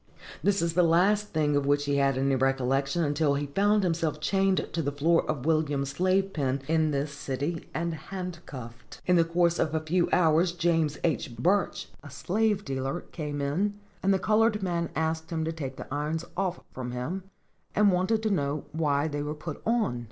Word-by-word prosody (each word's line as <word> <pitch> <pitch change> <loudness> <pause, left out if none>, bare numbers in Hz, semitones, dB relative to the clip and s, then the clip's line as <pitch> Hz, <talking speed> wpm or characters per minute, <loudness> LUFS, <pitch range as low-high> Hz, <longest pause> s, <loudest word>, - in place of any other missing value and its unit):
This 200 -3 +2
is 170 -1 0
the 180 - +4
last 190 +5 +3
thing 150 -5 +1
of 140 -1 +1
which 145 0 +2
he 140 0 +1
had 135 -1 +2
any 135 +1 +2
recollection, 135 +4 +1
until 145 -1 +1
he 145 +1 -1
found 205 +8 +2
himself 165 -4 0
chained 195 +4 +1
to 170 - 0
the 145 -2 -1
floor 160 +4 +2
of 145 -4 -2
Williams' 150 -4 +1
slave 190 +4 +1
pen 135 -2 -1
in 160 -1 +2
this 145 0 -1
city, 140 +3 -4
and 170 +1 -2
handcuffed. 160 -10 -8
In 180 - +4
the 170 - +5
course 170 +1 +1
of 155 0 0
a - - +2
few 170 +3 +1
hours, 170 0 +3
James 165 -4 +1
H. 130 -7 -1
Burch, 185 - +1 0.2
a 145 - -10
slave 205 +9 0
dealer, 135 +5 -2
came 150 -3 -4
in, 180 +9 0 0.3
and 195 - +2
the 195 - +4
colored 215 +1 +2
man 170 -2 -1
asked 160 0 -1
him 160 -1 -2
to 160 - -1
take 140 -5 -5
the - - -7
irons 155 +3 -2
off 185 -1 -1
from 125 -1 -5
him, 165 +10 -4 0.5
and 205 -1 +5
wanted 185 +5 +1
to 220 - +1
know 145 -5 -1
why 150 -2 +1
they 145 -1 -3
were 150 +1 -3
put 150 0 -7
on. 220 - +1
160 Hz, 195 wpm, -28 LUFS, 145-180 Hz, 0.5 s, the